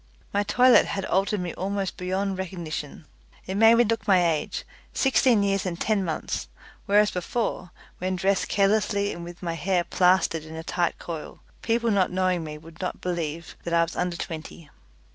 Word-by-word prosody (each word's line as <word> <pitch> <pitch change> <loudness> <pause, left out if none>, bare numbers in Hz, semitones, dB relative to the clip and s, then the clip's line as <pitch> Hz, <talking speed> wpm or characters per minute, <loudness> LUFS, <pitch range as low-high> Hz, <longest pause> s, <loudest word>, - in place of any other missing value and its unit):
My 200 - +2
toilet 250 +4 +5
had 195 -1 -3
altered 195 +1 +1
me 175 -2 -4
almost 195 0 -3
beyond 190 +1 -2
recognition. 165 -5 -5 0.4
It 190 - -4
made 225 +3 +6
me 240 - +5
look 225 -2 -1
my 185 -3 +5
age 155 - -3 0.3
sixteen 255 -5 +3
years 195 -1 +1
and 180 -2 -4
ten 215 -3 +1
months 160 - -3 0.4
whereas 205 +1 +4
before, 185 0 -2 0.3
when 185 +1 -1
dressed 190 +2 +1
carelessly 205 0 +1
and 170 - -8
with 175 +1 -10
my 170 -1 -2
hair 175 +2 0
plastered 180 -3 +2
in 160 0 -10
a 160 - -6
tight 175 0 -1
coil, 165 -3 -7 0.2
people 230 0 +1
not 195 -3 +3
knowing 185 -2 +1
me 150 -1 -6
would 160 +2 -13
not 185 - -3
believe 170 -2 -4
that 170 0 -1
I 170 - +5
was 165 - -5
under 180 -1 -1
twenty. 160 -1 -7
185 Hz, 180 wpm, -25 LUFS, 170-200 Hz, 0.4 s, made